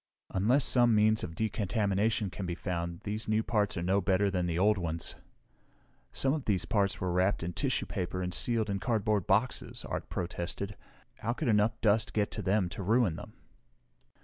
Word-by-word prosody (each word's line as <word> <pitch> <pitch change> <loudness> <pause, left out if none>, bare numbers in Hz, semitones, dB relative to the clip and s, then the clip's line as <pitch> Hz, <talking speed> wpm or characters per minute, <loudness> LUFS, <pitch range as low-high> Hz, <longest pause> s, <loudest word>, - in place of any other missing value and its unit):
"Unless 120 +9 +3
some 120 -3 +4
means 110 +1 +4
of 80 - -5
decontamination 105 -1 0
can 95 -1 -5
be 85 - -2
found 85 -2 -4
these 105 +1 -4
new 110 +1 +2
parts 105 -4 0
are 85 - -2
no 95 +3 +2
better 95 +1 +2
than 90 -2 0
the 85 -1 -1
old 105 +2 +3
ones." 85 -2 -3 1.0
"Some 135 0 +1
of 150 -4 -3
these 100 -4 0
parts 100 -3 +1
were 90 -1 -1
wrapped 90 +1 +1
in 90 +1 -3
tissue - - 0
paper 90 0 -3
and 90 0 -3
sealed 110 0 +1
in 100 - -1
cardboard 105 -4 0
boxes!" 110 +6 0
Art - - -4
protested. 90 +3 -4 0.4
"How 120 - -1
could 130 0 -2
enough 110 +2 +2
dust 110 0 +2
get 105 -1 0
to - - -4
them 95 -1 +1
to 100 - -6
ruin 105 -2 +2
them?" - - -9
100 Hz, 185 wpm, -30 LUFS, 90-110 Hz, 1.0 s, some